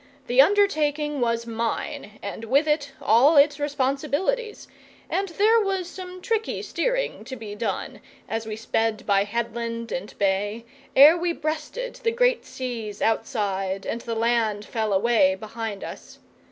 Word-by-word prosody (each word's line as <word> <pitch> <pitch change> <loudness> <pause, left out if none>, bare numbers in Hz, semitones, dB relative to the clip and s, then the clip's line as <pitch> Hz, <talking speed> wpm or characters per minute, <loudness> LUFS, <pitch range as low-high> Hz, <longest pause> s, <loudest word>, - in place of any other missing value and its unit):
The 250 +1 +6
undertaking 300 -6 +2
was 230 -1 0
mine, 230 0 -4
and 230 - -5
with 280 +7 +3
it 295 -2 0
all 265 +8 +5
its 290 +1 +5
responsibilities, 290 - -1 0.4
and 390 0 0
there 430 +7 +4
was 385 -4 -1
some 365 0 -9
tricky 450 -2 -1
steering - - -1
to 260 - -6
be 220 -4 -8
done 215 +2 -4 0.3
as 225 0 -3
we 215 - -4
sped 225 0 -1
by 200 -1 +3
headland 230 +1 -3
and 195 +4 -5
bay, 205 +3 0 0.3
ere 295 +5 +9
we 345 0 -1
breasted 315 +11 -4
the 465 - 0
great - - +1
seas 230 -5 -5
outside 195 -4 -1
and 235 - -3
the 230 -1 -4
land 225 -2 +1
fell 220 -2 -2
away 235 +8 +3
behind 220 -3 -6
us. - - -9
250 Hz, 145 wpm, -24 LUFS, 225-320 Hz, 0.4 s, ere